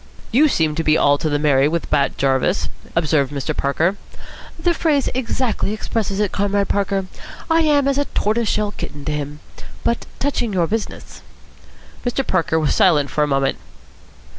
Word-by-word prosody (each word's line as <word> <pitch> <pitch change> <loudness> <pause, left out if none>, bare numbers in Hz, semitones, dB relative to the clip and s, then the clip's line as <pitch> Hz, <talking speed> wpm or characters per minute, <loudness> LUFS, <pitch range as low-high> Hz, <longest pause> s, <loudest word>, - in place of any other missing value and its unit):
"You 290 +7 +5
seem 160 - +1
to 165 +2 -2
be 155 0 +3
all 145 0 +3
to 155 - -1
the 145 - +1
merry 145 -2 +3
with 170 +2 -2
Bat 145 -2 +1
Jarvis," 130 - +1 0.3
observed 150 -4 +1
Mr. 145 +2 -3
Parker. 165 +8 0 0.6
"The 350 - +1
phrase 300 -5 +1
exactly 245 -4 -1
expresses 215 -2 -2
it, 210 -2 +1
Comrade 200 0 0
Parker. 195 -1 0 0.5
I 325 0 +5
am 290 -3 +3
as 275 0 +1
a 285 - +1
tortoiseshell 215 -2 0
kitten 145 -7 -8
to - - -1
him. 150 0 -4 0.4
But, 235 - -1
touching 245 -6 -1
your 175 -3 +2
business?" 220 +5 -5 0.8
Mr. 250 +2 -1
Parker 165 -3 +1
was 155 - +1
silent 145 -7 +3
for 150 - +1
a - - +1
moment. 135 -1 0
185 Hz, 165 wpm, -20 LUFS, 150-230 Hz, 0.8 s, You